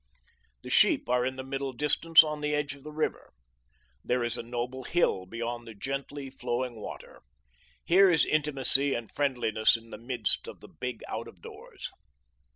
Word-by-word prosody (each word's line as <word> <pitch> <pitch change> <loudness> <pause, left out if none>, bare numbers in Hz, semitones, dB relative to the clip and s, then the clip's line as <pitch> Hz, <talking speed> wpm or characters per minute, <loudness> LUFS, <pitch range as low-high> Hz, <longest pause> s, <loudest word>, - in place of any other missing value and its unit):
The - - -7
sheep - - +4
are 125 0 +3
in 130 +1 -1
the 130 - -5
middle 135 0 -3
distance 150 +4 +5
on 150 -1 -4
the 150 0 0
edge 145 -2 -1
of 140 - -14
the 150 - -8
river. 155 +1 -2 0.7
There 125 0 0
is 120 - -1
a - - -4
noble 120 +2 -4
hill 95 - +1
beyond 120 +2 -4
the 110 - -9
gently 135 +4 -5
flowing 125 -2 -3
water. - - -9 0.6
Here 190 +2 +6
is 165 -3 +4
intimacy 140 -2 +1
and 115 -2 -5
friendliness 120 -6 +2
in 115 0 -16
the - - -8
midst 115 -3 -1
of - - -9
the - - -13
big 125 -2 -6
out 115 +1 -4
of 90 -6 -15
doors. - - -9
130 Hz, 175 wpm, -29 LUFS, 120-145 Hz, 0.7 s, Here